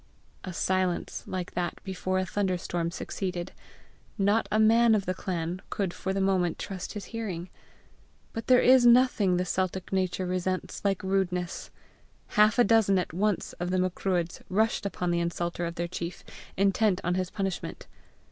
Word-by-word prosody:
A 185 - -5
silence 185 0 -1
like 185 -1 -4
that 175 -1 -2
before 185 -1 -2
a 185 - +1
thunderstorm 180 -4 -1
succeeded: 180 0 -4 0.7
not 205 +2 +2
a 215 - +2
man 225 +1 +5
of 200 -2 0
the 185 - 0
clan 175 -1 -3
could 190 -4 -2
for 190 - -3
the 195 - -1
moment 185 -3 +1
trust 190 -2 -6
his 205 -3 -6
hearing. 190 -6 -4 0.8
But 225 - -5
there 255 -1 +6
is 255 0 +7
nothing 235 -6 +5
the 180 - 0
Celtic 185 +1 -2
nature 185 -1 0
resents 185 +1 -2
like 195 -2 0
rudeness: 185 -2 -1 0.6
half 210 +2 +4
a 245 - +7
dozen 220 -3 +4
at 180 - -2
once 200 +1 0
of 175 +1 -2
the 185 - +1
Macruadhs 180 -1 -1
rushed 215 +1 +1
upon 180 -3 -2
the 170 - +1
insulter 170 0 -2
of 170 - -6
their 170 0 -2
chief, 170 0 -6 0.3
intent 200 0 +3
on 175 - +1
his 185 -1 -1
punishment. 195 -3 -4
185 Hz, 165 wpm, -28 LUFS, 180-200 Hz, 0.8 s, is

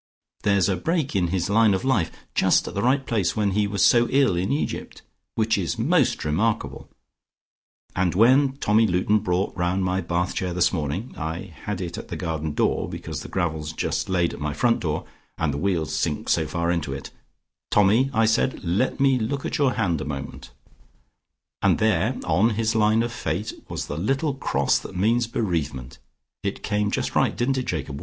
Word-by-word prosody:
There's 100 -3 +3
a 100 - +1
break 155 - -1
in 90 -3 +2
his 90 0 -1
line 110 -1 +4
of 105 - -3
life, 105 -12 +2 0.2
just - - +3
at - - -6
the 100 - -1
right 135 +3 +2
place, 105 -9 0
when 105 -2 +1
he 105 +1 +1
was 100 -2 +2
so 120 0 +5
ill 135 -8 +3
in 90 +3 -1
Egypt, 145 - -3 0.3
which 110 -1 +1
is 85 -4 -2
most - - +2
remarkable, 100 +9 -1 1.1
and 90 -1 +1
when 130 +6 +5
Tommy 110 -4 +2
Luton 95 +3 +2
brought 95 -1 -1
round 90 +1 0
my 90 +1 0
bath 85 +1 -1
chair 90 -1 -2
this 90 0 +2
morning 85 - -3
I 80 +4 -5
had 105 -2 -3
it 85 -2 -5
at - - -9
the - - -5
garden 80 -2 -3
door, - - 0
because - - -6
the - - -8
gravel's 80 -4 -2
just - - -2
laid 90 -2 +1
at - - -8
my 75 0 -2
front 120 -2 +2
door, 75 -2 -2 0.3
and 80 -4 0
the 70 - -3
wheels 80 -4 -1
sink 75 -1 -2
so 80 -2 +2
far 85 +1 -1
into 80 -6 -2
it 70 - -7 0.6
'Tommy,' 105 +6 +4
I 115 -3 +3
said, 115 +3 +1
'let 95 +12 0
me 135 -2 +3
look 135 +5 -2
at - - -2
your 135 -3 +3
hand 85 -9 0
a - - -2
moment,' 70 -2 -6 1.1
and - - +3
there 110 -7 +1
on 110 +3 +2
his 110 0 +1
line 110 +1 +3
of 120 - -3
fate, 100 0 -3 0.2
was - - -4
the 75 - -5
little 135 - 0
cross 70 - +1
that 90 - -9
means 115 +5 +2
bereavement. 80 - -3 0.4
It 100 - -4
came 105 0 0
just - - -2
right - - +1
didn't 130 +2 +1
it, 130 - -5
Jacob? 70 -4 -3
95 Hz, 195 wpm, -24 LUFS, 85-115 Hz, 1.1 s, so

